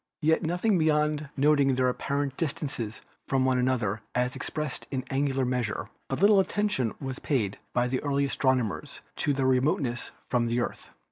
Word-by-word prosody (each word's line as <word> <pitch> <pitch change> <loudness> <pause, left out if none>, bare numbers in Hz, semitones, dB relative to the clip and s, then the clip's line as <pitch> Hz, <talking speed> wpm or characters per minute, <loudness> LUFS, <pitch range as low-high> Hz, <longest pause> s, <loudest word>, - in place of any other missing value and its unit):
Yet 160 +1 +4
beyond 155 -5 +1
noting 140 -1 +4
their 130 0 +2
apparent 140 +2 -1
distances 135 -8 -3 0.3
from 135 -1 +2
one 130 -1 +2
another 120 -5 0
as 125 0 +1
expressed 150 -3 -4
in 130 -2 -2
angular 135 -1 +1
measure, 125 -3 -2 0.2
but - - -2
little 200 +1 +6
attention 195 - 0
was 135 -1 -5
paid 110 -9 -1
by 125 0 +1
the 130 +1 -1
early 140 -1 +1
astronomers 130 -6 0 0.2
to 145 - +1
their 135 -1 0
remoteness 130 -1 +1 0.2
from 120 -1 +1
the 120 +1 0
Earth. 120 - -4
135 Hz, 155 wpm, -28 LUFS, 125-150 Hz, 0.3 s, little